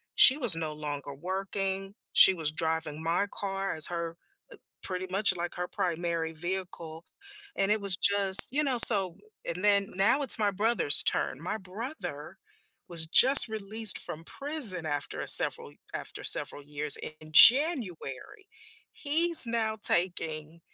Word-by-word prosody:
she 265 - +4
was 240 - +3
no 160 -2 -7
longer 145 -2 -10
working, 195 +4 -7 0.2
she 190 - +4
was 160 -4 -6
driving 160 -1 -6
my 170 +5 -3
car 195 -1 -7
as 155 - +2
her 170 -1 -8 0.7
pretty 185 0 -8
much, 195 0 -2
like, 175 0 -8
her 180 0 -8
primary 170 -2 -6
vehicle, 170 -1 -9 0.5
and 195 +1 -3
it 215 - -2
was 195 -2 -2
just, 200 -1 +6
you 290 +4 -3
know 260 -4 -4
so, 195 -7 +6 0.3
and 170 +2 -7
then 200 -1 -1
now 200 +10 -1
it's 265 - +5
my 210 -1 -2
brother's 205 -6 +1
turn. 130 - -4
My 180 +6 -7
brother 190 - -11 0.5
was 165 -2 -7
just 255 - +6
released 215 0 -1
from 160 +1 -9
prison 275 - 0
after 145 -1 -5
a - - -8
several - - +3 0.2
after - - -6
several 145 - +1
years 145 +1 0 0.2
in 155 - -17
January. 245 - 0 0.5
He's 325 0 +5
now 225 -2 -5
taking 165 -3 -1
185 Hz, 145 wpm, -25 LUFS, 160-215 Hz, 0.7 s, just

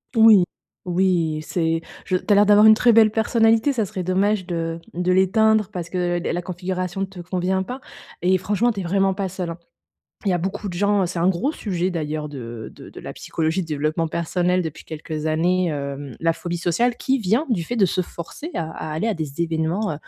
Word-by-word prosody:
Oui, 220 -4 +7 0.4
oui 175 -3 +1
et - - -4
c'est 165 +1 -1 0.2
je 185 - +1
tu - - -11
as 205 - +7
l'air 205 0 +5
d'avoir 210 +1 +7
une 220 - +9
très 235 +2 +4
belle 220 -1 +6
personnalité, 225 +4 +3
ça 225 -4 0
serait 185 - -5
dommage 190 +1 +1
de 165 -1 -3 0.2
de 180 +1 0
l'éteindre 210 +3 +3
parce 175 -4 -5
que 175 -1 0
la - - -2
la 175 - -1
configuration 185 +1 -4
ne - - +1
te 190 -1 -13
convient 185 +2 -1
pas 250 +7 -5 0.4
et 185 +1 +4
franchement 210 +6 +1
tu 205 - -5
es - - -3
vraiment 195 +2 +2
pas 195 0 -3
seul, 180 -2 -4
hein. 165 - -7 0.7
Il 195 - +1
y - - +3
a 175 - +1
beaucoup 190 +3 -3
de 180 - -6
gens 200 +1 +2
c'est 175 0 -4
un 170 +2 +3
gros 190 - 0
sujet 185 - -2
d'ailleurs 155 -3 -3
de 120 -5 -7
de - - -12
de - - -10
la - - -7
psychologie 160 +3 -2
de - - -8
développement 155 +2 -1
personnel 180 +3 0
depuis 160 -2 -7
quelques 155 0 -6
années, 175 +3 +1
hem, 140 -3 -5
la 165 0 +2
phobie 175 +1 -4
sociale 200 +9 +1
qui 265 +2 0
vient 225 - +1
du 200 -8 0
fait 240 - -4
de 200 -4 +4
se 185 - 0
forcer 175 - -8
à 160 -1 -3
à 155 - -6
aller 160 +9 -1
à 220 - 0
des 155 -3 -5
événements, 165 +4 0
heu - - -3
180 Hz, 225 wpm, -22 LUFS, 165-205 Hz, 0.7 s, une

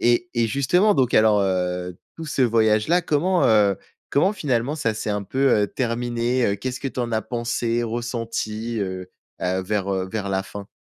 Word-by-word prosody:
Et 120 +9 +2
et, 120 -1 +2
justement, 175 - +2
donc 125 -3 +2
alors, 110 -1 +5
heu, 90 -1 -1 0.2
tout 165 - -7
ce 150 - -3
voyage 110 -3 +3
là, 175 +2 +3
comment, 175 +4 +1
heu, 105 -3 +4 0.3
comment, 185 +8 +3
finalement, 135 - -1
ça 115 -7 -1
s'est 110 0 -3
un 105 0 -1
peu, 135 +5 +1
heu, - - +2
terminé? 120 0 -1
Heu, 100 - +1
qu'est-ce 130 +5 -5
que 135 - -2
tu 130 - -5
en 120 -1 -3
as 110 - +1
pensé, 120 0 -1
ressenti, 115 -1 -3
heu, 95 -1 -4 0.3
bah, 95 +1 -1
vers, 100 0 -2
heu, 95 -1 -2
vers 100 -2 -3
la 95 0 0
fin? 100 +1 -9
115 Hz, 195 wpm, -23 LUFS, 105-130 Hz, 0.3 s, alors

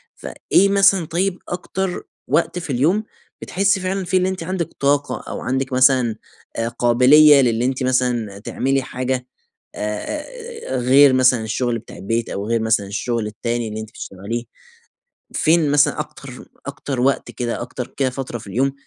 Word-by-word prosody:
فإيه 200 +1 +1
مثلًا 195 -3 +4
طيب 180 +3 -1
أكتر 180 +1 -3 0.2
وقت 170 +1 +1
في 165 - -8
اليوم 155 - +2 0.4
بتحسي 195 +1 +1
فعلًا 190 +1 -2
فيه 185 +1 +1
اللي 185 0 +1
أنتِ 190 -2 -4
عندِك 175 -1 -3
طاقة 145 +1 +1
أو - - -5
عندِك 130 +1 -2
مثلًا 130 -3 +4 0.4
آآ، 115 - 0
قابلية 130 +5 +6
للي 120 -1 +1
أنتِ 130 0 -1
مثلًا 125 -5 0
تعملي 135 +5 -1
حاجة، 130 0 -3 0.5
آآ 310 - -5
غير 130 +2 +6
مثلًا 125 -3 +4
الشُغل 115 +1 -1
بتاع - - -13
البيت 115 +4 -2
أو 100 - -4
غير 115 0 +1
مثلًا 110 -3 +1
الشُغل 105 +3 -2
التاني 115 +2 -3
اللي 110 +1 -5
أنتِ 110 - -9
بتشتغليه؟ 110 +2 -6 0.9
فين 160 -2 +3
مثلًا 145 +1 +3
أكتر 140 -4 -9 0.2
أكتر 135 -2 -4
وقت 135 +2 +1
كده، 120 -1 -3
أكتر 125 0 -6
كده 135 -2 +1
فترة 125 -2 -5
في 110 - -13
اليوم 130 +7 0
130 Hz, 155 wpm, -20 LUFS, 120-165 Hz, 0.9 s, قابلية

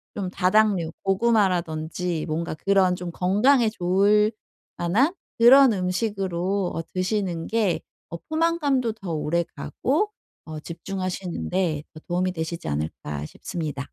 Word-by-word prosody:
좀 190 -3 -3
다당류 185 -3 +2
고구마라든지 180 -5 0
뭔가 160 +1 -2
그런 190 0 +2
좀 175 -1 -6
건강에 215 +8 +3
좋을 205 +3 +3 0.5
만한 230 - +2 0.3
그런 255 +1 +8
음식으로 190 -1 -1
어 165 - -1
드시는 185 -3 -1
게 215 -5 +1 0.3
어 170 - -6
포만감도 300 -8 +1
더 195 -6 -7
오래가고 170 - -1 0.3
어 155 -1 -7
집중하시는데 180 -2 -3
더 155 - -10
도움이 180 +1 0
되시지 160 - -4
않을까 75 0 -4
싶습니다. 150 - -5
185 Hz, 275 characters per minute, -24 LUFS, 170-215 Hz, 0.5 s, 그런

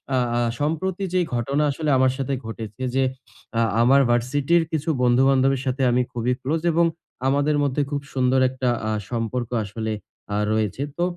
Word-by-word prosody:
আ - - +3 0.2
আ - - +2 0.2
সম্প্রতি 175 +6 -1
যে, 185 - +3 0.2
ঘটনা 140 +5 0
আসলে 155 +1 -2
আমার 130 0 +4
সাথে 135 0 -2
ঘটেছে 110 +1 -7
যে, 135 - +3 0.6
আ - - +4 0.2
আমার 135 +3 +5
ভার্সিটির 140 +7 +2
কিছু 160 0 -2
বন্ধু-বান্ধবের 130 +1 +3
সাথে 130 +1 -1
আমি 125 +1 +3
খুবই 120 +1 0
ক্লোজ 155 +4 -1
এবং 170 +1 +3 0.4
আমাদের 145 +2 +2
মধ্যে 140 +1 0
খুব 145 -1 -2
সুন্দর 130 0 +2
একটা 130 -1 -1 0.2
আ - - 0 0.2
সম্পর্ক 120 0 -2
আসলে 110 +2 -4 0.4
আ - - +1
রয়েছে। 110 +4 -1 0.2
তো 175 - +1
130 Hz, 165 wpm, -23 LUFS, 120-145 Hz, 0.6 s, আমার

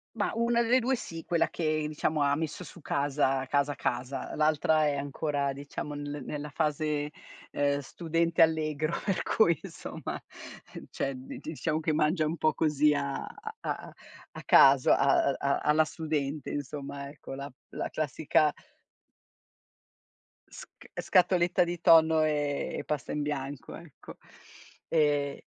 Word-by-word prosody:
Ma 210 - 0
una 235 +1 +2
delle 245 +2 +4
2 255 +1 0
sì, 165 -8 -7
quella 170 -1 +1
che 155 -2 -1
diciamo 155 0 -1
ha 140 0 +3
messo 160 +3 -4
su 175 - -13
casa, 140 -2 0
casa, 145 0 +1
casa. 130 +1 -3
L'altra 155 0 +3
è 145 -1 +1
ancora 140 0 -2
diciamo 145 +1 -6
nel 145 -1 -6
nella 150 0 -5
fase, 150 -1 -1 0.4
ehm, 140 0 +1
studente 165 +4 0
allegro 155 -1 +2
per 195 -3 0
cui 170 -8 +3
insomma - - -7 0.7
cioè 135 - -2
di 130 +1 -9
diciamo 155 0 -2
che 155 0 0
mangia 155 +2 +2
un 155 +2 -1
po' 155 -1 +1
così 150 -1 +3
a 140 -1 -2 0.4
a - - -5 0.4
a - - -9
caso 135 -1 +6
a 135 0 +4
a - - -4
a 140 0 +1
alla 155 +1 +3
studente 150 -3 -3
insomma 140 0 -5
ecco, 140 -1 -10
la 140 +1 -6 0.2
la - - -4
classica 155 0 +1 2.0
sc - - -14
scatoletta 180 -1 +3
di 175 0 -4
tonno, 160 -2 +6
ehm, 145 -2 -1
e - - -5
pasta 150 -2 -3
in 150 - -2
bianco 145 -2 -4
ecco, 165 -4 -13 0.7
ehhm 145 -3 +1
150 Hz, 140 wpm, -29 LUFS, 140-160 Hz, 2.0 s, caso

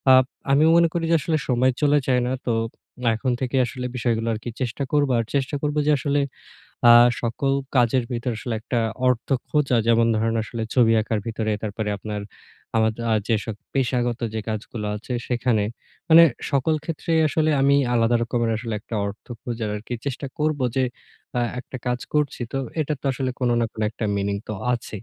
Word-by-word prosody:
Up 130 0 +6 0.3
আমি 140 +2 +5
মনে 170 0 +6
করি 170 -1 -1
যে - - +6
আসলে 155 +2 0
সময় 130 +1 +3
চলে 145 0 +4
যায় 125 -2 +3
না, 125 - 0
তো 120 - +2 0.6
এখন 125 +3 -1
থেকেই 130 0 +1
আসলে 125 +1 -5
বিষয়গুলো 115 -2 0
আর 110 - -4
কি 120 - -4
চেষ্টা 130 +2 -2
করবো। 145 -2 +2
আর 115 - -1
চেষ্টা 140 +1 0
করব 150 0 -1
যে 150 - +4
আসলে 140 +1 0 0.7
আ - - +11 0.3
সকল 125 +4 -1 0.2
কাজের 125 0 +3
ভিতরে 120 0 -2
আসলে 115 +1 -3
একটা 120 +2 -2 0.3
অর্থ 125 -2 0 0.2
খোঁজা। 145 -4 +2
যেমন 115 0 +4
ধরেন 115 +1 +1
আসলে 115 +1 -5
ছবি 120 -3 +5
আঁকার 110 0 -1
ভিতরে 110 -1 -2
তারপরে 110 0 -3
আপনার 105 +1 -5
আ - - -11
আমার 110 0 +3 0.2
আ - - +3 0.2
যেসব 110 -1 0 0.2
পেশাগত 125 -2 0
যে 110 - -1
কাজগুলো 110 0 -4
আছে 115 +4 -7
সেখানে 120 -3 +1 0.4
মানে 165 0 +9 0.3
সকল 140 +2 +2
ক্ষেত্রেই 165 0 0
আসলে 155 +1 +1
আমি 140 +1 +4 0.2
আলাদা 115 0 +3
রকমের 115 -1 0 0.3
একটা 115 - -8
অর্থ 100 +1 -8 0.2
খোঁজার 115 -3 -3
আরকি 110 +4 -6
চেষ্টা 140 +1 -3
করব। 155 -1 +1 0.2
যে 130 - +3 0.5
আ - - +2 0.2
একটা 130 - -9
কাজ 125 0 0
করছি। 150 -3 0
তো 135 - -1 0.2
এটা 150 0 -1
তো - - -33
আসলে 130 0 -2
কোন 125 -1 +2
না - - +2
কোন - - -8
একটা 115 - -5
মিনিং 100 0 -1
তো - - -2 0.2
আছেই। 110 -4 -5
125 Hz, 185 wpm, -23 LUFS, 115-140 Hz, 0.7 s, আ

